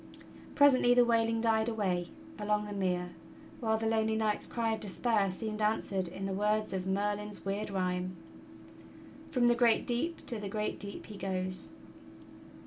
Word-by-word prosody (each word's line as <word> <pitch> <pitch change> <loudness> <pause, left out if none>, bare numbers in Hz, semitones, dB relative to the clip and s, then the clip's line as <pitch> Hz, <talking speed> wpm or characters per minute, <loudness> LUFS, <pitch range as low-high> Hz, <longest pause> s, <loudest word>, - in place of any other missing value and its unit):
Presently 260 -4 +6
the 245 -1 +6
wailing 230 -1 +2
died 225 0 +2
away 185 -6 -1 0.3
along 210 0 0
the 205 - -6
mere, 180 -2 -1 0.5
while 220 -2 +1
the 225 - -3
lonely 220 0 +2
knight's 215 -1 0
cry 230 -2 -1
of 220 - -3
despair 205 0 +1
seemed 215 +3 -4
answered 200 -3 0
in 190 +3 -6
the 195 - -2
words 210 +2 +1
of 190 -1 -2
Merlin's 205 +1 -2
weird 200 +2 -2
rhyme: 185 -1 -1 1.1
"From 250 -2 +2
the 240 - +6
great 240 -2 +3
deep 295 +8 -2
to 230 - -3
the 205 -1 -5
great 210 +1 -2
deep 200 0 -5
he 210 - -9
goes." 185 -1 -2
210 Hz, 160 wpm, -32 LUFS, 195-225 Hz, 1.1 s, Presently